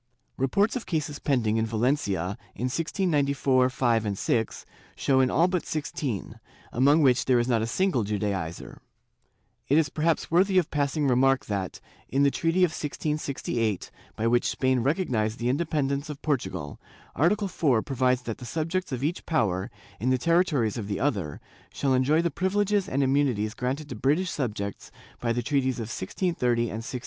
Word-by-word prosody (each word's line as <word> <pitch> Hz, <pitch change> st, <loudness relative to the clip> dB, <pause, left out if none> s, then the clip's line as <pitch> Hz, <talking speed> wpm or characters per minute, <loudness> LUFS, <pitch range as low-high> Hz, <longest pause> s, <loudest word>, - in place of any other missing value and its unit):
Reports 200 Hz, -, +1 dB
of 250 Hz, -, -4 dB
cases 150 Hz, -3 st, -2 dB
pending 115 Hz, -6 st, +1 dB
in 110 Hz, -, +1 dB
Valencia 110 Hz, -, 0 dB, 0.2 s
in -, -, -6 dB
1694 140 Hz, -4 st, +1 dB
5 115 Hz, -6 st, 0 dB
6, 115 Hz, +2 st, -1 dB, 0.3 s
show 135 Hz, -1 st, +2 dB
in 130 Hz, -1 st, +4 dB
all 165 Hz, +6 st, +3 dB
but 180 Hz, -2 st, -1 dB
sixteen, 145 Hz, -7 st, -4 dB, 0.3 s
among 145 Hz, +5 st, +4 dB
which 125 Hz, -2 st, +4 dB
there 130 Hz, -2 st, +4 dB
is 120 Hz, 0 st, +1 dB
not 120 Hz, -3 st, +2 dB
a 110 Hz, -, -1 dB
single 170 Hz, -, +1 dB
Judaizer,^ 100 Hz, -5 st, -3 dB, 0.9 s
It 145 Hz, -, +4 dB
is 160 Hz, -3 st, +3 dB
perhaps 160 Hz, +3 st, 0 dB
worthy 185 Hz, +3 st, +4 dB
of 175 Hz, -4 st, +2 dB
passing 145 Hz, 0 st, 0 dB
remark 135 Hz, +1 st, +3 dB
that, 100 Hz, -3 st, -3 dB, 0.3 s
in 135 Hz, +2 st, +2 dB
the 140 Hz, -, +4 dB
treaty 165 Hz, +5 st, +1 dB
of 175 Hz, -, +3 dB
1668, 140 Hz, -, -2 dB, 0.2 s
by 110 Hz, -, -2 dB
which 120 Hz, +1 st, +3 dB
Spain 130 Hz, -1 st, +1 dB
recognized 120 Hz, -, 0 dB
the 120 Hz, +1 st, -1 dB
independence 140 Hz, -1 st, -1 dB
of 145 Hz, -2 st, -6 dB
Portugal, 95 Hz, -, -2 dB, 0.4 s
Article 200 Hz, -, +2 dB
4 135 Hz, -, +1 dB
provides 130 Hz, -2 st, +1 dB
that 115 Hz, -3 st, -5 dB
the 125 Hz, -, -8 dB
subjects 165 Hz, +5 st, -2 dB
of 130 Hz, 0 st, -3 dB
each 160 Hz, +5 st, -2 dB
power, 100 Hz, -, 0 dB, 0.3 s
in 120 Hz, +6 st, 0 dB
the 130 Hz, -, +3 dB
territories 150 Hz, -, +2 dB
of 100 Hz, -, -5 dB
the 100 Hz, -, -2 dB
other, 100 Hz, -, -1 dB, 0.3 s
shall 135 Hz, -2 st, 0 dB
enjoy 145 Hz, +6 st, +3 dB
the 170 Hz, -, 0 dB
privileges 200 Hz, +4 st, 0 dB
and 140 Hz, +1 st, +1 dB
immunities 130 Hz, -6 st, +1 dB
granted 130 Hz, +5 st, -3 dB
to -, -, -6 dB
British 160 Hz, +6 st, +1 dB
subjects 105 Hz, -7 st, -4 dB, 0.3 s
by 115 Hz, -, 0 dB
the 120 Hz, +1 st, -1 dB
treaties 130 Hz, -1 st, +1 dB
of 115 Hz, -1 st, -5 dB
1630 125 Hz, -, 0 dB
and 120 Hz, -, 0 dB
1667. 125 Hz, +2 st, -5 dB
135 Hz, 170 wpm, -26 LUFS, 115-155 Hz, 0.9 s, in